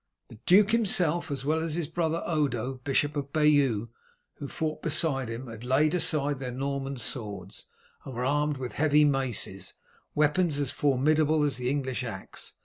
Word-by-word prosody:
The 110 Hz, -, -13 dB
duke 200 Hz, +3 st, +6 dB
himself, 180 Hz, -8 st, +2 dB
as 135 Hz, -2 st, -4 dB
well 155 Hz, +2 st, +1 dB
as 160 Hz, -1 st, -2 dB
his 170 Hz, -3 st, -2 dB
brother 165 Hz, 0 st, -1 dB
Odo, 135 Hz, -5 st, -1 dB
Bishop 145 Hz, +2 st, +1 dB
of 140 Hz, -1 st, -4 dB
Bayeau, 140 Hz, -8 st, +3 dB, 0.5 s
who 145 Hz, -, -6 dB
fought 155 Hz, +2 st, -3 dB
beside 145 Hz, -6 st, 0 dB
him, 115 Hz, +3 st, -5 dB
had 115 Hz, -1 st, -9 dB
laid 135 Hz, +5 st, +2 dB
aside 145 Hz, -5 st, +1 dB
their 130 Hz, -2 st, -4 dB
Norman 135 Hz, +1 st, -3 dB
swords, 105 Hz, -4 st, -6 dB, 0.4 s
and 130 Hz, -, -8 dB
were 125 Hz, +1 st, -2 dB
armed 145 Hz, +1 st, +1 dB
with 125 Hz, -2 st, -5 dB
heavy 150 Hz, 0 st, +4 dB
maces, 125 Hz, -9 st, -1 dB, 0.4 s
weapons 150 Hz, +1 st, +2 dB
as 140 Hz, -3 st, -1 dB
formidable 150 Hz, +3 st, +2 dB
as 145 Hz, -4 st, +1 dB
the 125 Hz, 0 st, -1 dB
English 130 Hz, -2 st, -2 dB
axe. 100 Hz, -6 st, -8 dB
145 Hz, 165 wpm, -28 LUFS, 130-155 Hz, 0.5 s, duke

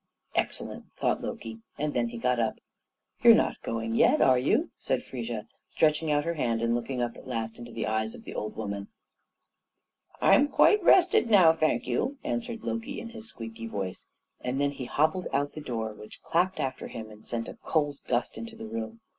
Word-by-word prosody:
"Excellent!" -, -, -2 dB
thought -, -, +1 dB
Loki, 115 Hz, 0 st, -6 dB, 0.2 s
and 150 Hz, 0 st, -1 dB
then 120 Hz, -1 st, +1 dB
he 120 Hz, -, -7 dB
got 125 Hz, +1 st, +1 dB
up. 110 Hz, -1 st, +1 dB, 0.7 s
"You're -, -, +9 dB
not -, -, +1 dB
going 115 Hz, 0 st, -3 dB
yet, -, -, +5 dB
are 130 Hz, -1 st, +5 dB
you?" 225 Hz, -, +1 dB
said 130 Hz, -, -1 dB
Frigga, 120 Hz, -4 st, -5 dB, 0.2 s
stretching 155 Hz, 0 st, +2 dB
out 145 Hz, 0 st, +2 dB
her 170 Hz, -, 0 dB
hand 115 Hz, -7 st, 0 dB
and 115 Hz, 0 st, +2 dB
looking 120 Hz, +1 st, -1 dB
up 120 Hz, -1 st, -3 dB
at -, -, -12 dB
last 115 Hz, -2 st, -3 dB
into 120 Hz, 0 st, -9 dB
the 115 Hz, -1 st, -3 dB
eyes 110 Hz, +1 st, -1 dB
of -, -, -12 dB
the -, -, -8 dB
old 105 Hz, -, -4 dB
woman. 100 Hz, -2 st, -4 dB, 1.3 s
"I'm 280 Hz, -, +6 dB
quite 420 Hz, +7 st, +5 dB
rested 350 Hz, -9 st, +5 dB
now, 185 Hz, -7 st, +7 dB
thank 155 Hz, -7 st, +1 dB
you," 250 Hz, -, -1 dB
answered 235 Hz, -1 st, -3 dB
Loki 235 Hz, +5 st, -3 dB
in 230 Hz, -, -7 dB
his 230 Hz, -1 st, -7 dB
squeaky 115 Hz, 0 st, -7 dB
voice, 95 Hz, -4 st, -4 dB, 0.3 s
and 125 Hz, +2 st, -2 dB
then 140 Hz, 0 st, +2 dB
he 135 Hz, -3 st, -6 dB
hobbled 155 Hz, +8 st, +1 dB
out 145 Hz, +1 st, +1 dB
at -, -, -31 dB
the 155 Hz, -, -7 dB
door, 115 Hz, -5 st, -3 dB
which 105 Hz, 0 st, -13 dB
clapped 185 Hz, +3 st, +1 dB
after 130 Hz, -1 st, -2 dB
him, 110 Hz, -1 st, -8 dB
and 105 Hz, 0 st, -15 dB
sent 115 Hz, -1 st, -3 dB
a -, -, -9 dB
cold 145 Hz, -3 st, 0 dB
gust 120 Hz, -2 st, 0 dB
into 115 Hz, 0 st, -7 dB
the 110 Hz, -, -8 dB
room. 110 Hz, 0 st, -5 dB
125 Hz, 200 wpm, -28 LUFS, 115-155 Hz, 1.3 s, You're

